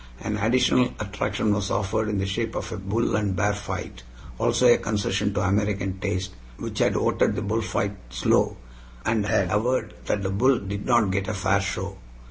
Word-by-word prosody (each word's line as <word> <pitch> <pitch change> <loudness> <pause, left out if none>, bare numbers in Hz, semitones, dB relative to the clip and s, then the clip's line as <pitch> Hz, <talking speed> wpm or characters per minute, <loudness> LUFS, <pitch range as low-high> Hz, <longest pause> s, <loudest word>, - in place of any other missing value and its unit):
An 105 - -3
additional 125 +3 +3
attraction 105 0 -1
was 100 -1 -1
offered 110 +2 0
in 105 - -1
the 95 - 0
shape 110 +4 -2
of - - -4
a 110 - -4
bull 100 +5 0
and 105 -3 0
bear 100 +2 +2
fight, 100 -10 -6 0.4
also 125 - +2
a 120 - +6
concession 105 -1 0
to - - +1
American 100 -1 0
taste, 95 0 -2 0.3
which - - -5
had - - +3
voted - - +2
the - - -2
bullfight 105 -1 -1
"slow," - - +2 0.5
and 110 -2 +1
had 95 -2 +1
averred 125 +5 0
that 100 - 0
the 95 - -1
bull 125 +6 +3
"did 100 0 -5
not 120 -6 +4
get 95 0 -1
a 110 - -2
fair 100 +1 +2
show." 95 0 -4
100 Hz, 185 wpm, -25 LUFS, 95-110 Hz, 0.5 s, a